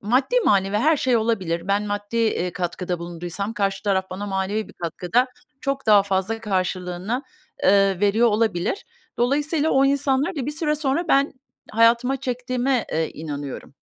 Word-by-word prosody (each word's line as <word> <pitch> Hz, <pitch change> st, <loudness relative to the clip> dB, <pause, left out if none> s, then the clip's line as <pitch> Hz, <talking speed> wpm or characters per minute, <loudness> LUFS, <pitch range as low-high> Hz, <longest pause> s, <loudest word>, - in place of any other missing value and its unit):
maddi, 260 Hz, -, +2 dB
manevi 195 Hz, 0 st, +3 dB
her 305 Hz, +9 st, +3 dB
şey 255 Hz, -3 st, +2 dB
olabilir. 190 Hz, -6 st, -1 dB
Ben 200 Hz, +1 st, +2 dB
maddi, 205 Hz, +2 st, -4 dB
eee, 215 Hz, -6 st, +1 dB
katkıda 180 Hz, 0 st, -3 dB
bulunduysam 175 Hz, +4 st, -5 dB
karşı 195 Hz, -2 st, -1 dB
taraf 190 Hz, -2 st, 0 dB
bana 195 Hz, +3 st, -5 dB
manevi 195 Hz, +2 st, -2 dB
bir -, -, -13 dB
katkıda 180 Hz, +9 st, 0 dB, 0.3 s
çok 275 Hz, -2 st, -2 dB
daha 210 Hz, -2 st, +7 dB
fazla 195 Hz, +3 st, -1 dB
karşılığını, 185 Hz, +3 st, -2 dB, 0.4 s
eee, 195 Hz, -1 st, +4 dB
veriyor 210 Hz, +4 st, +4 dB
olabilir. 215 Hz, -, 0 dB, 0.3 s
Dolayısıyla 295 Hz, +5 st, +1 dB
o 270 Hz, +1 st, +4 dB
insanları 280 Hz, +4 st, +1 dB
da 260 Hz, -, -2 dB
bir -, -, -1 dB
süre 300 Hz, 0 st, -1 dB
sonra 300 Hz, +3 st, -1 dB
ben 275 Hz, 0 st, +3 dB, 0.4 s
hayatıma 235 Hz, +4 st, +3 dB
çektiğime, 250 Hz, -1 st, -1 dB
eee, 160 Hz, 0 st, 0 dB
inanıyorum. 145 Hz, -3 st, -7 dB
215 Hz, 150 wpm, -23 LUFS, 190-260 Hz, 0.4 s, daha